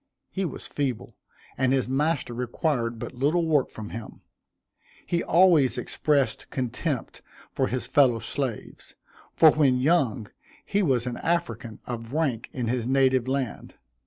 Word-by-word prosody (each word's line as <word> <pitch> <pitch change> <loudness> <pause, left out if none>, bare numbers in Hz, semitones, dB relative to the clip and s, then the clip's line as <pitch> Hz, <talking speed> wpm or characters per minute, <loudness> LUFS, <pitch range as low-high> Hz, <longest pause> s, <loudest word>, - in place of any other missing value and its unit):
He 195 -1 -2
was 165 - -6
feeble, 130 -7 -3 0.4
and 130 -1 +2
his 135 -2 +1
master 140 -1 0
required 120 0 -1
but - - -6
little 150 +7 +1
work 150 -5 +2
from 110 -1 -8
him. 115 -2 -8 0.8
He 170 -1 0
always 160 -8 +4
expressed 140 -6 0
contempt 130 +2 -3 0.3
for 130 - 0
his 130 0 -2
fellow 130 -5 +4
slaves, 120 +1 -5 0.4
for 160 - +7
when 140 -5 +3
young, 130 -6 +1 0.4
he 205 - +1
was 130 - +1
an 125 -1 -3
African 125 -10 -2
of 115 0 -6
rank 135 -8 -1
in 125 -3 -3
his 120 0 -1
native 130 -2 +3
land. 130 -3 -3
130 Hz, 140 wpm, -26 LUFS, 120-150 Hz, 0.8 s, for